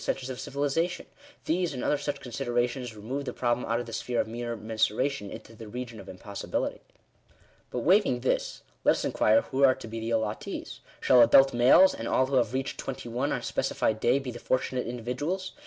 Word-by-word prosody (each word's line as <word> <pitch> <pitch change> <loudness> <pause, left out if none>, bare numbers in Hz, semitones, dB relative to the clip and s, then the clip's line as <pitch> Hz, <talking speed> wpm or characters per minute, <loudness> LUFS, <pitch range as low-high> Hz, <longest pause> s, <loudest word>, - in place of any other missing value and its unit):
to - - -8
the - - +2
centres 130 -1 -8
of 125 - -7
civilisation 145 +5 -1 0.2
— 290 - -24
these, 170 -2 0
and 125 - -4
other - - +2
such 145 0 -3
considera 120 0 0
tions, 125 -2 -7
remove 125 +7 -4
the 135 - -4
problem 120 0 0
out 115 +1 +1
of 120 - -4
the 115 - -9
sphere 120 0 -2
of - - +1
mere 120 +1 -4
mensura 110 +3 +1
tion 120 -8 -7
into 115 - -10
the 110 0 -10
region 120 0 -6
of - - -11
impossibility. 100 +2 -4 0.9
But, 125 - -3
waiving 175 - +3
this, 130 - -1 0.2
let - - +5
us - - -3
inquire 110 +1 +3
who 135 +1 -1
are 130 -1 +6
to - - -10
be 115 +1 -5
the 115 +1 -4
allottees. 110 -2 -3 0.2
Shall 125 -2 +6
adult 135 +4 +7
males, 125 +10 +6
and 115 - -5
all 130 - +3
who 135 0 0
have 115 -4 +2
reached 135 +1 -3
twenty 125 -2 -5
one 125 +5 -1
on - - -1
a - - -13
specified 110 0 0
day, 120 +4 +3
be 135 -2 -4
the 120 - -9
fortunate 130 0 -1
individuals 130 +11 -3
125 Hz, 220 wpm, -28 LUFS, 115-135 Hz, 0.9 s, adult